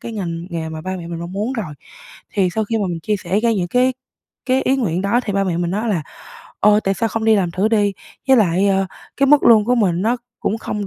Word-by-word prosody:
cái 230 - -7
ngành 170 -5 -4
nghề 165 -2 -4
mà 160 0 -6
ba 185 +2 -4
mẹ 170 -2 -8
mình 170 -1 -5
mong 170 +1 -6
muốn 210 +6 -2
rồi. 195 - -5 0.6
Thì 195 -3 +2
sau 220 - 0
khi 225 +2 -1
mà 205 - 0
mình 170 -2 -4
chia 210 +6 -1
sẻ 195 +1 -1
ra 235 +1 +2
những 180 -5 -1
cái 250 +4 +2 0.5
cái 260 +1 +2
ý 265 - +2
nguyện 185 -9 -1
đó 200 +5 +2
thì 205 - -2
ba 195 0 +1
mẹ 175 -3 -1
mình 175 0 -1
nói 215 +5 -2
là, 185 -7 0 0.6
ờ, 210 +1 +5
"Tại 195 - +1
sao 225 +4 -1
không 225 0 -3
đi 220 -1 +5
làm 185 -4 0
thử 190 +5 0
đi?", 205 -3 +2 0.4
với 265 - +6
lại, 195 -2 +3
ơ, 195 0 +2 0.3
cái 275 - +3
mức 295 +1 +5
lương 220 -3 +6
của 245 +3 +2
mình 185 -6 +1
nó 230 +4 +1 0.2
cũng 220 - -1
không 210 -2 -4
200 Hz, 270 wpm, -19 LUFS, 175-225 Hz, 0.6 s, với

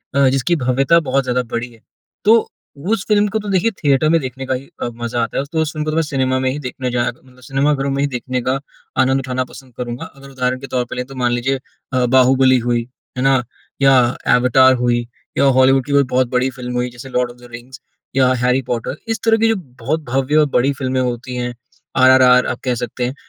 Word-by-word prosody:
अ, 140 -1 +4
जिसकी 135 +6 +1
भव्यता 135 +6 +3
बहुत 135 +1 +2
ज़्यादा 125 0 0
बड़ी 120 +1 -3
है, 115 - -20 0.4
तो 225 +1 +4 0.4
उस 225 -4 0
फ़िल्म 210 -1 +3
को 220 - +1
तो 205 -1 -6
देखिए 195 +4 +2
थिएटर 145 +2 +3
में 165 0 +4
देखने 130 0 -6
का 130 - -1
ही 130 +2 -4 0.2
अ, - - 0 0.2
मज़ा 120 0 -1
आता 115 - -4
है। - - +2
उस 140 - -13
तो 160 -1 0
उस 155 -1 -2
फ़िल्म 155 0 -2
को 160 - +1
सिनेमा 130 -4 0
में 130 0 0
ही 145 - -4
देखने 125 -1 -4
जाया 120 -1 0
क 120 - -23
मतलब 130 -1 -20
सिनेमा 140 +3 +1
घरों 140 0 -2
में 140 - -1
ही - - +2
देखने 125 0 -3
का 130 +2 -1 0.4
आनंद 130 +1 +2
उठाना 130 -1 -2
पसंद 130 -3 -14
करूँगा। 120 0 -5
अगर 140 0 -13
उदाहरण 130 -1 -2
के 135 - -8
तौर 125 -1 -1
पर - - -5
लें, 125 0 -3
तो 135 - -12
मान 125 -2 0
लीजिए 130 +2 0 0.3
अ, 125 -1 +2
बाहुबली 130 +1 +4
हुई, 120 0 -1 0.3
है 125 - -1
ना, 135 -2 +3 0.4
या 135 0 +6 0.4
अवतार 130 +1 +5
हुई, 120 -1 0 0.3
या - - +4
हॉलीवुड 130 0 +4
की 145 - -6
कोई 140 0 +5
बहुत 130 -1 +3
बड़ी 125 +1 +1
फ़िल्म 125 -1 -7
हुई, 125 0 -1
जैसे 125 +2 -11
लॉर्ड 125 -1 0
ऑफ़ 120 - -17
द 120 0 -14
रिंग्स 120 +3 -10 0.4
या 130 -1 +4
हैरी 125 +1 +2
पॉटर, 120 +2 -3
इस 225 0 -2
तरह 225 0 +4
की 225 +1 +2
जो 225 - +2 0.2
बहुत 150 +7 -2
भव्य 135 +3 0
और 155 - +5
बड़ी 135 +3 +2
फ़िल्में 130 -1 -2
होती 125 0 -3
हैं, 125 0 -3 0.4
आरआरआर 130 -1 +6
आप 125 - -3
कह 125 -2 0
सकते 120 +1 -3
हैं। 130 - -4
130 Hz, 240 wpm, -18 LUFS, 125-135 Hz, 0.4 s, या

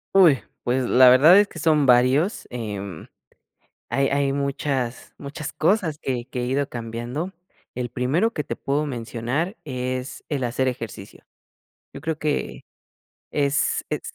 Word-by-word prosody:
Uy, 165 -9 +6 0.2
pues, 130 +1 +1
la 130 0 +7
verdad 150 +10 +8
es 205 - +4
que 165 - -13
son 150 -2 +3
varios, 130 - +3
em, 100 -7 -6 0.8
hay 135 0 +1
hay 140 -1 +1
muchas 140 -3 -2
muchas 145 +1 -6
cosas 160 -2 +1
que 125 -3 -2
que 125 -1 -4
he 120 - -1
ido 140 +2 0
cambiando. 120 +9 -5 0.4
El 125 0 -3
primero 155 - +1
que 150 - -2
te - - -5
puedo 145 +2 -1
mencionar 125 - -3
es 130 -2 -4
el 140 -4 -2
hacer 125 +2 0
ejercicio. 115 -4 -6 0.7
Yo - - -9
creo 160 -1 -3
que 150 -2 -2 0.7
es 140 0 +1
es - - -2
135 Hz, 145 wpm, -23 LUFS, 125-150 Hz, 0.8 s, verdad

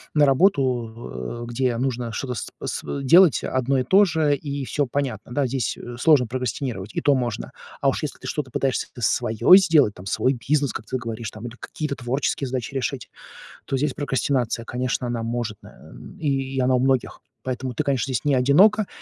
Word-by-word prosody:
на 150 - +6
работу, 120 - 0
э, - - -5
где 120 -1 0
нужно 125 -2 -2
что-то 125 +3 -4
сп 110 - -5 0.2
св 140 - -4
делать 170 +3 +6
одно 130 +1 0
и - - 0
то 195 +10 +5
же, 155 -4 +1
и 140 -1 -5
всё 145 0 -1
понятно, 125 -4 -3
да, 140 0 +1
здесь 125 -4 -2 0.2
сложно 150 -6 +5
прокрастинировать, 125 -4 -4
и - - 0
то 145 - +4
можно. 120 -4 -3 0.3
А - - +4
уж - - -2
если - - -4
ты - - -8
что-то 145 -4 -3
пытаешься 135 0 -1
с 115 - +1
свое 115 - +5
сделать, 160 - +4
там 90 - -12
свой 130 +7 +1
бизнес, 140 +3 0
как 110 - -6
ты 130 - -2
говоришь, 115 -2 -5
там, 110 +2 -10
или 120 - -9
какие-то 150 -3 -4
творческие 130 +2 -2
задачи 125 0 -4
решить, 130 -4 -3 0.6
то - - -2
здесь 145 0 0
прокрастинация, 130 -4 -1
конечно, 125 0 -2
она 120 -1 -3
может, 115 -2 -3
на - - -15 0.3
и 135 -3 -1
она 130 0 +3
у 125 - +2
многих. 130 -1 0 0.2
Поэтому 130 0 -3
ты, 150 - -1
конечно, 135 -2 -1
здесь 120 - -1
не 145 -2 +3
одинока, 190 +12 +4
130 Hz, 190 wpm, -23 LUFS, 120-140 Hz, 0.6 s, на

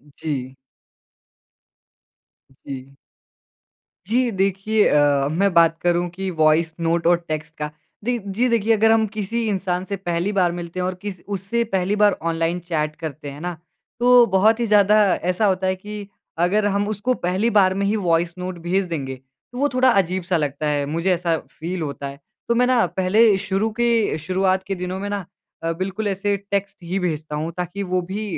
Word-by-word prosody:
जी। 135 -4 -4 2.0
जी। 135 0 -10 1.1
जी 245 +3 +2
देखिए 195 +2 +1
अ, 145 -1 +3
मैं 195 +3 +1
बात 165 -1 +5
करूँ 175 0 +1
कि 190 +2 -4
वॉइस 155 +1 +3
नोट 165 0 0
और 175 0 +5
टेक्स्ट 155 0 -4
का। 150 0 -4 0.3
दे 245 +1 0
जी 225 +6 +1
देखिए 225 -1 +3
अगर 225 +1 +4
हम 225 -1 +4
किसी 220 +2 -3
इंसान 185 -2 -1
से 200 - -1
पहली 175 +1 -2
बार 180 -2 +3
मिलते 175 +1 -6
हैं 180 - 0
और 185 0 -2
किस, 200 -4 -6
उससे 200 +4 -1
पहली 195 -2 0
बार 205 -1 +3
ऑनलाइन 165 +2 -1
चैट 155 -3 -2
करते 155 -2 -6
हैं 145 - -10
ना, 175 -1 -4 0.4
तो 245 0 +7
बहुत 220 +4 +4
ही 235 - +1
ज़्यादा 210 0 +5 0.2
ऐसा 180 +4 0
होता 190 -1 +1
है 185 - +1
कि 205 +1 -8 0.4
अगर 205 +3 +1
हम 200 0 +1
उसको 215 +4 0
पहली 190 +2 0
बार 190 -2 +5
में 200 +1 -1
ही 205 +2 +1
वॉइस 170 -3 +1
नोट 180 0 -5
भेज 185 +3 0
देंगे 135 -6 -4 0.4
तो 245 - -9
वो 285 +2 +2
थोड़ा 255 0 +4
अजीब-सा 185 -3 +1
लगता 150 0 -2
है 145 -1 0
मुझे 165 +6 0
ऐसा 170 -2 0 0.2
फ़ील 175 +2 -3
होता 140 -2 -4
है। 140 0 -9 0.3
तो 235 - +3
मैं 250 +1 +3
ना 250 -4 +3
पहले 190 +4 +3
शुरू 195 +2 -1
के, 230 -8 +2
शुरुआत 185 +4 0
के 195 - -2
दिनों 180 +1 -4
में 205 +1 -4
ना 200 -3 -3 0.4
अ, 165 - 0
बिल्कुल 190 +5 -3
ऐसे 200 +1 0 0.2
टेक्स्ट 200 0 -1
ही 185 +3 -2
भेजता 155 -4 -3
हूँ 155 +3 -3
ताकि 180 +3 -3
वो 185 -1 0
भी 195 +5 -5
185 Hz, 185 wpm, -22 LUFS, 165-205 Hz, 2.0 s, तो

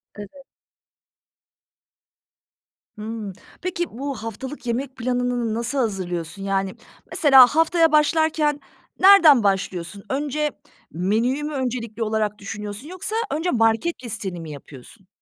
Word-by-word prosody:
Evet. 205 -1 -8 2.7
Hımm, 215 -2 -6 0.3
peki, 350 -1 -2
bu 275 +4 -5
haftalık 250 +4 -7
yemek 255 +3 -3
planını 245 -2 -1
nasıl 235 +5 -1
hazırlıyorsun? 190 -6 -3
Yani, 195 -1 -1 0.4
mesela 270 -5 +7
haftaya 325 0 +3
başlarken 305 -1 +2 0.4
nereden 340 - +7
başlıyorsun? 195 -1 -2
Önce 295 +2 -1 0.4
menüyü 225 - 0
mü 300 +1 -4
öncelikli 235 -4 -3
olarak 215 -1 -1
düşünüyorsun 205 +5 -7
yoksa 370 +5 -3 0.2
önce 325 +4 -1
market 225 +7 +1
listeni 215 -6 -4
mi 160 -2 -8
yapıyorsun? 145 - -13
235 Hz, 105 wpm, -22 LUFS, 205-295 Hz, 2.7 s, mesela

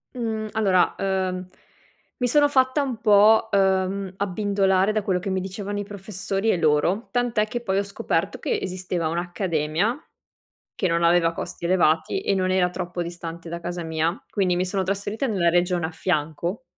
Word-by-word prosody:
Mhmm, 220 -3 -2
allora, 195 -5 +2
uhm, 185 -1 -1 0.7
mi 250 - 0
sono 290 +4 +4
fatta 260 +1 +3
un 265 -4 -2
po', 215 0 +5
uhm, 190 -1 +1
abbindolare 195 0 +1
da 215 -1 -1
quello 190 -3 0
che 195 +2 -4
mi 190 0 0
dicevano 200 +2 -4
i - - -2
professori 200 +1 -3
e 185 - +3
loro. 165 +7 +1
Tant'è 240 -3 +1
che 240 +2 -4
poi 195 -5 -1
ho 200 - +2
scoperto 200 0 -2
che 460 - -1
esisteva 180 -2 -3
un'accademia 175 - -1 0.7
che 190 - 0
non 170 0 +1
aveva 170 0 +4
costi 170 - -6
elevati 165 -3 +2
e - - 0
non 185 -1 +1
era 185 -1 +3
troppo 180 -1 -4
distante 170 -1 -7
da 170 +1 -5
casa 175 0 -4
mia. 160 +2 -1
Quindi 185 -3 +1
mi 180 +1 0
sono 190 +1 -1
trasferita 200 +6 -2
nella 190 -7 +2
regione 175 0 +1
a - - -8
fianco 170 - -2
190 Hz, 170 wpm, -24 LUFS, 175-205 Hz, 0.7 s, po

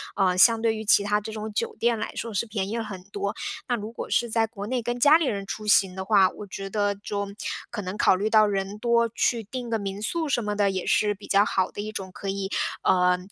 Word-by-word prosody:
呃， 185 -2 +2
相 225 +3 +6
对 225 -1 +1
于 220 0 -6
其 200 - +5
他 210 +1 +1
这 215 +1 -7
种 215 0 -5
酒 - - -2
店 235 -1 +1
来 - - -3
说 230 -2 -4
是 205 - 0
便 205 -3 -3
宜 230 - -2
了 230 - -2
很 195 -4 -8
多。 200 0 -4 0.3
那 245 - +1
如 215 -1 -6
果 230 - -7
是 235 - +1
在 225 0 +2
国 205 -3 -7
内 250 +1 -1
跟 240 +1 -3
家 295 +5 +7
里 330 - -1
人 200 -6 -2
出 215 +2 -6
行 195 -3 +4
的 190 0 -5
话， 195 -3 +5
我 205 - -10
觉 195 +1 -6
得， 205 -1 0
就 200 0 -4 0.4
可 220 -3 -5
能 190 +2 -5
考 - - +4
虑 205 +3 -1
到 215 -1 +5
人 195 0 -2
多， 235 0 +2
去 230 -1 +1
定 245 +3 -6
个 225 - +1
民 200 0 -5
宿 320 +8 0
什 240 -4 +1
么 210 0 -2
的 200 -1 +2
也 185 -1 -3
是 210 -1 +2
比 200 0 -13
较 200 +1 +4
好 185 -1 0
的 205 - -6
一 215 - -5
种 190 -3 -6
可 195 - -6
以， 195 0 -3 0.3
呃， 180 -1 +3
210 Hz, 285 characters per minute, -25 LUFS, 195-225 Hz, 0.4 s, 家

